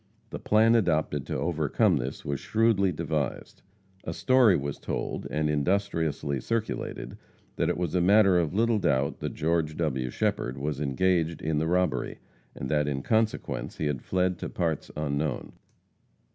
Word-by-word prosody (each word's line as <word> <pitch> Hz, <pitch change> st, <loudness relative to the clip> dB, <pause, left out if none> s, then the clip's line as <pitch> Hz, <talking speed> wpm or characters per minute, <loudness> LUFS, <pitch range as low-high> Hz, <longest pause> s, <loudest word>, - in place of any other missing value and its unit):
The -, -, -5 dB
plan 110 Hz, +2 st, +4 dB
adopted 80 Hz, -, +1 dB
to -, -, -2 dB
overcome 85 Hz, -, +1 dB
this 65 Hz, +1 st, -5 dB
was 70 Hz, -1 st, -2 dB
shrewdly 110 Hz, -4 st, +2 dB
devised. 75 Hz, -4 st, -3 dB, 0.4 s
A 80 Hz, -, -4 dB
story 130 Hz, -8 st, +4 dB
was 70 Hz, 0 st, -4 dB
told, -, -, -4 dB
and 75 Hz, 0 st, 0 dB
industriously 75 Hz, -3 st, 0 dB
circulated, 115 Hz, -1 st, -3 dB, 0.4 s
that -, -, +1 dB
it -, -, 0 dB
was 90 Hz, -3 st, -2 dB
a 90 Hz, -, +2 dB
matter 95 Hz, 0 st, +5 dB
of 80 Hz, -3 st, 0 dB
little 115 Hz, +3 st, +2 dB
doubt 70 Hz, -6 st, 0 dB
that -, -, -4 dB
George 80 Hz, -1 st, 0 dB
W. 65 Hz, -6 st, -1 dB
Shepherd 60 Hz, +1 st, -1 dB
was 70 Hz, +1 st, -3 dB
engaged 85 Hz, +3 st, +1 dB
in 75 Hz, -1 st, 0 dB
the 80 Hz, -, 0 dB
robbery, 90 Hz, +2 st, 0 dB, 0.4 s
and 65 Hz, -, -5 dB
that 75 Hz, +1 st, +1 dB
in 70 Hz, -2 st, -2 dB
consequence 110 Hz, -1 st, -1 dB
he -, -, -2 dB
had 75 Hz, -4 st, -1 dB
fled 90 Hz, -1 st, 0 dB
to -, -, -4 dB
parts 80 Hz, -4 st, -2 dB
unknown. 75 Hz, -2 st, -2 dB
80 Hz, 160 wpm, -27 LUFS, 75-95 Hz, 0.4 s, matter